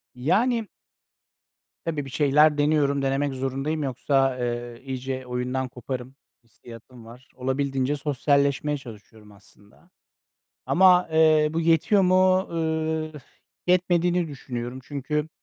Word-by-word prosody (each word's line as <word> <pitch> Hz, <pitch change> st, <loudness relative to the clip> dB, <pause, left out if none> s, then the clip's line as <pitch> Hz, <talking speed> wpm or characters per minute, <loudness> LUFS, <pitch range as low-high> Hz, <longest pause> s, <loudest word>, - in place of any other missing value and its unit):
Yani. 220 Hz, -, +1 dB, 1.2 s
Tabii, 150 Hz, -4 st, -3 dB
bir -, -, -9 dB
şeyler 150 Hz, +2 st, +3 dB
deniyorum, 145 Hz, -2 st, +2 dB
denemek 135 Hz, +1 st, 0 dB
zorundayım 135 Hz, +4 st, -3 dB
yoksa, 135 Hz, 0 st, 0 dB
eee, 120 Hz, -1 st, -4 dB
iyice 130 Hz, 0 st, -5 dB
oyundan 125 Hz, +1 st, -2 dB
koparım 125 Hz, +1 st, -7 dB, 0.3 s
hissiyatım 115 Hz, +1 st, -14 dB
var. 125 Hz, +4 st, -15 dB
Olabildiğince 135 Hz, +1 st, -1 dB
sosyalleşmeye 140 Hz, +1 st, 0 dB
çalışıyorum 110 Hz, -3 st, -14 dB
aslında 100 Hz, 0 st, -22 dB, 0.8 s
ama, 180 Hz, -1 st, +5 dB
eee, 155 Hz, -1 st, +4 dB
bu 165 Hz, -, -1 dB
yetiyor 165 Hz, +5 st, +3 dB
mu, 185 Hz, 0 st, +4 dB
ııı, 160 Hz, -1 st, -2 dB
ıh, 150 Hz, -, -9 dB, 0.5 s
yetmediğini 175 Hz, -1 st, +2 dB
düşünüyorum. 125 Hz, -2 st, -6 dB
Çünkü, 150 Hz, +2 st, -3 dB
140 Hz, 110 wpm, -24 LUFS, 130-160 Hz, 1.2 s, ama